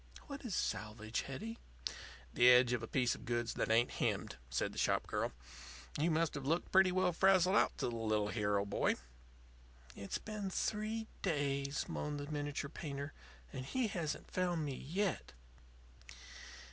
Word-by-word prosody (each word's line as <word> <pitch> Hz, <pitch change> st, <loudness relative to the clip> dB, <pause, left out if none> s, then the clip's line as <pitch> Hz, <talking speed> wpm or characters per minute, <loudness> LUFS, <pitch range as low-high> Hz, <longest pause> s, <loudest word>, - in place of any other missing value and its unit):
What 280 Hz, -1 st, -7 dB
is 235 Hz, -7 st, -2 dB
'salvage,' 110 Hz, +1 st, -2 dB
Hetty?" 220 Hz, -, -5 dB, 0.7 s
"The 120 Hz, +1 st, +7 dB
edge 125 Hz, 0 st, +7 dB
of 120 Hz, -, 0 dB
a 115 Hz, -, -5 dB
piece 125 Hz, -1 st, +2 dB
of -, -, -9 dB
goods 120 Hz, -1 st, -1 dB
that -, -, -1 dB
ain't 115 Hz, +2 st, +4 dB
hemmed," -, -, -1 dB
said 60 Hz, -, 0 dB
the -, -, -5 dB
shop -, -, +2 dB
girl. -, -, -1 dB, 0.7 s
"You 160 Hz, +3 st, +3 dB
must 165 Hz, 0 st, +2 dB
have 140 Hz, -2 st, -4 dB
looked 165 Hz, +4 st, 0 dB
pretty 190 Hz, -1 st, +6 dB
well 185 Hz, -1 st, +2 dB
frazzled 190 Hz, +1 st, +5 dB
out -, -, +3 dB
to -, -, 0 dB
the 120 Hz, -, -3 dB
little 110 Hz, -2 st, +1 dB
hero 105 Hz, -2 st, +1 dB
boy." 100 Hz, -, +1 dB, 1.0 s
"It's 100 Hz, -1 st, -3 dB
been 210 Hz, -3 st, -4 dB
three 215 Hz, +3 st, -1 dB, 0.2 s
days," 140 Hz, -4 st, 0 dB
moaned 150 Hz, -1 st, -3 dB
the 145 Hz, +1 st, -5 dB
miniature 145 Hz, -1 st, -2 dB
painter, 140 Hz, -1 st, -5 dB, 0.4 s
"and 130 Hz, -2 st, -4 dB
he 235 Hz, -, 0 dB
hasn't 160 Hz, -6 st, -3 dB
found 175 Hz, -4 st, 0 dB
me 140 Hz, -, -2 dB
yet." 180 Hz, +8 st, -2 dB
145 Hz, 160 wpm, -36 LUFS, 120-185 Hz, 1.0 s, The